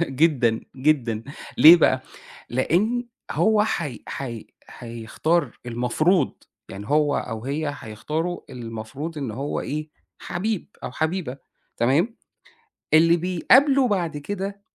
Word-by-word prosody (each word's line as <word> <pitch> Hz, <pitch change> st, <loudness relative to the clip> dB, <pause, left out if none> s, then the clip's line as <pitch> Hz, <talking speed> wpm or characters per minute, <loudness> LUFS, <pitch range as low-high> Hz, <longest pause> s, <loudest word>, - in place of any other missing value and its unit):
جدًا، 130 Hz, -5 st, +2 dB, 0.2 s
جدًا، 130 Hz, -6 st, +1 dB, 0.4 s
ليه 165 Hz, +3 st, +10 dB
بقى؟ 130 Hz, -5 st, +3 dB, 0.5 s
لإن 210 Hz, -, +1 dB, 0.2 s
هو 215 Hz, -1 st, +3 dB
حي 150 Hz, -, -3 dB
حي 120 Hz, -5 st, -6 dB, 0.2 s
حيختار 120 Hz, +6 st, -2 dB
المفروض، 125 Hz, +8 st, +1 dB, 0.3 s
يعني 100 Hz, +2 st, -8 dB
هو 150 Hz, -1 st, +2 dB
أو 110 Hz, -1 st, -4 dB
هي 145 Hz, +2 st, -2 dB
هيختاروا 150 Hz, +11 st, -4 dB
اللي 125 Hz, -2 st, -8 dB
المفروض 135 Hz, +9 st, -6 dB
إن 135 Hz, -6 st, -3 dB
هو 135 Hz, +7 st, -3 dB
إيه، 150 Hz, +2 st, -4 dB, 0.3 s
حبيب 200 Hz, +2 st, -3 dB, 0.2 s
أو -, -, -5 dB
حبيبة، 160 Hz, -4 st, -2 dB, 0.4 s
تمام، 155 Hz, -, +2 dB, 0.8 s
اللي 165 Hz, +2 st, +6 dB
بيقابله 255 Hz, -, +4 dB
بعد 175 Hz, -7 st, -1 dB
كده 200 Hz, +5 st, -5 dB
150 Hz, 115 wpm, -24 LUFS, 125-175 Hz, 0.8 s, ليه